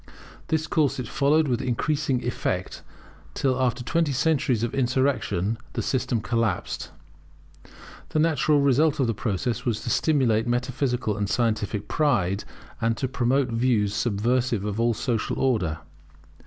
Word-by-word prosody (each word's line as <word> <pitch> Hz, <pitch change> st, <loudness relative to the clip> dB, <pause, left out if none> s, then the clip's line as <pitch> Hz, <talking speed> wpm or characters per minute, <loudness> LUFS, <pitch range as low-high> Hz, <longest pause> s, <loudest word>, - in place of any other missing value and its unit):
This 160 Hz, 0 st, 0 dB
course 155 Hz, -4 st, +1 dB
it 125 Hz, -3 st, -4 dB
followed 150 Hz, +5 st, +2 dB
with 120 Hz, -3 st, 0 dB
increasing 135 Hz, +1 st, 0 dB
effect, 95 Hz, -6 st, -2 dB, 0.5 s
till 130 Hz, -1 st, +1 dB
after 125 Hz, 0 st, 0 dB
twenty 165 Hz, +4 st, +1 dB
centuries 135 Hz, -4 st, +1 dB
of 120 Hz, -, -2 dB
insurrection, 125 Hz, -6 st, 0 dB
the -, -, -2 dB
system 125 Hz, -3 st, 0 dB
collapsed. 115 Hz, 0 st, -1 dB, 1.2 s
The -, -, -2 dB
natural 155 Hz, -2 st, +3 dB
result 145 Hz, +3 st, +3 dB
of 135 Hz, -, +3 dB
the 115 Hz, -, 0 dB
process 110 Hz, +2 st, -2 dB
was 115 Hz, -4 st, -1 dB
to 120 Hz, -, -3 dB
stimulate 125 Hz, -8 st, +2 dB
metaphysical 125 Hz, -2 st, -1 dB
and 100 Hz, -1 st, -2 dB
scientific 105 Hz, -2 st, -1 dB
pride, 105 Hz, -, +1 dB, 0.4 s
and 115 Hz, 0 st, +1 dB
to 130 Hz, -, -1 dB
promote 130 Hz, +1 st, +1 dB
views 115 Hz, -3 st, +1 dB
subversive 120 Hz, 0 st, 0 dB
of 105 Hz, +1 st, -3 dB
all 115 Hz, 0 st, +2 dB
social 115 Hz, -1 st, -1 dB
order. 100 Hz, -12 st, +1 dB
125 Hz, 140 wpm, -25 LUFS, 110-140 Hz, 1.2 s, natural